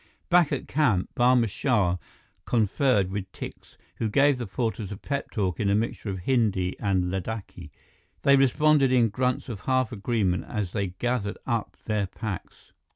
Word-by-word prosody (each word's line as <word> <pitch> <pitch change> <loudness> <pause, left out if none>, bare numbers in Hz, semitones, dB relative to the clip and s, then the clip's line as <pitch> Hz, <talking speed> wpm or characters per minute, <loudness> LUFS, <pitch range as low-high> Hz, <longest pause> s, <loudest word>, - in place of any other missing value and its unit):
Back 175 -3 +5
at 140 - -2
camp, 125 -11 +1
Barma 125 -1 +4
Shah 100 -5 +1 0.5
conferred 110 -3 +2
with 100 -1 -4
Tikse, - - -9 0.2
who 110 0 -1
gave 140 +3 +3
the 120 - -4
porters 110 -1 -3
a 100 - -5
pep 140 +6 -4
talk 95 -7 -2
in 100 - +1
a 100 - +3
mixture 110 0 -2
of 95 - -3
Hindi 100 -5 +1
and 95 -3 0
Ladakhi. 95 -3 -5 0.5
They 140 - +6
responded 140 +1 +4
in 120 -3 +4
grunts 125 +4 -1
of 115 -6 -5
half 130 +3 0
agreement 105 -4 0
as 105 -6 -3
they 100 -2 -1
gathered 105 +3 -2
up 115 -2 -2
their 105 -3 0
packs. 105 -2 -7
110 Hz, 160 wpm, -26 LUFS, 95-125 Hz, 0.5 s, They